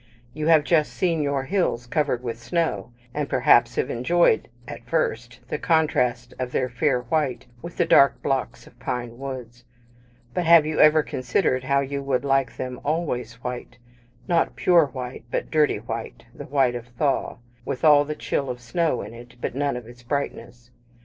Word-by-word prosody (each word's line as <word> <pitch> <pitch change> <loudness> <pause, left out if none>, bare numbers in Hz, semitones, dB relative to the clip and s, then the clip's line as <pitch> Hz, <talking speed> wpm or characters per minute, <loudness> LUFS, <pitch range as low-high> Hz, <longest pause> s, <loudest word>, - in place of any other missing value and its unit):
You 155 +1 -3
have 160 -2 +6
just 155 -1 +2
seen 170 -4 0
your 140 -2 0
hills 135 -7 -1
covered 135 -2 -1
with 115 -2 -4
snow, 165 +1 -1 0.2
and, 145 -1 -2
perhaps, 120 -1 +4
have - - -1
enjoyed, 125 +1 +2 0.2
at - - -8
first, 120 -6 -1
the - - -2
contrast 125 -7 +1
of 125 -1 -3
their 130 0 0
fair 125 +1 +1
white 130 0 -1 0.2
with 170 - -9
the 175 - +3
dark 140 -4 +5
blocks 135 -2 -2
of - - -19
pine 120 -1 -4
woods; 125 -3 -7 0.7
but 180 - 0
have 165 -2 +7
you 155 0 -2
ever 155 0 +6
considered 130 +1 -1
how 140 0 +2
you 140 +1 -3
would 135 0 -1
like 135 -3 +1
them 125 -1 -5
always 140 -7 -2
white 125 -1 -6 0.5
not 170 -1 +1
pure 170 -4 +4
white, 125 -3 -7
but - - -3
dirty 155 -2 +3
white - - -7
the - - -9
white 135 -3 +2
of 120 0 -6
thaw, 140 -3 0 0.3
with 130 - -3
all 145 -2 +7
the 150 +1 -5
chill 140 -2 -2
of 125 -1 -4
snow 160 +7 -1
in - - -9
it, 120 +1 -13
but - - -3
none 140 0 -1
of 125 - -8
its 120 +1 -14
brightness? 120 -2 -5
135 Hz, 180 wpm, -24 LUFS, 125-155 Hz, 0.7 s, have